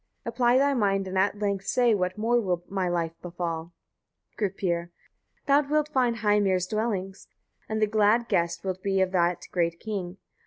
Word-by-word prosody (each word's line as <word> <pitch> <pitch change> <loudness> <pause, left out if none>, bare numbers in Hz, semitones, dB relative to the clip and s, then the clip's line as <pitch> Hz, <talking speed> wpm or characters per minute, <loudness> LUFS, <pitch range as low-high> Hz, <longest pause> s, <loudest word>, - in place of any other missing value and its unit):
Apply 245 0 +2
thy 280 +1 +3
mind, 195 -5 +1
and 190 - -5
at 195 +2 +2
length 200 -2 -2
say 245 -2 +3
what 185 -2 -1
more 235 +3 +2
will 180 -4 -1
my 190 -2 -1
life 170 -2 -1
befall. 170 -1 -4 0.6
Gripir. 180 -4 -2 0.6
19. 280 0 +3
Thou - - -8
wilt 305 0 +2
find 250 -5 +1
Heimir's 205 -4 +2
dwellings, 195 -2 -3 0.4
and 220 0 -1
the 215 - +4
glad 215 +2 +2
guest 170 -4 0
wilt 185 -1 -3
be 195 0 0
of 185 -1 +1
that 175 -1 +1
great 170 -1 0
king. 195 -4 -5
195 Hz, 170 wpm, -27 LUFS, 180-220 Hz, 0.6 s, the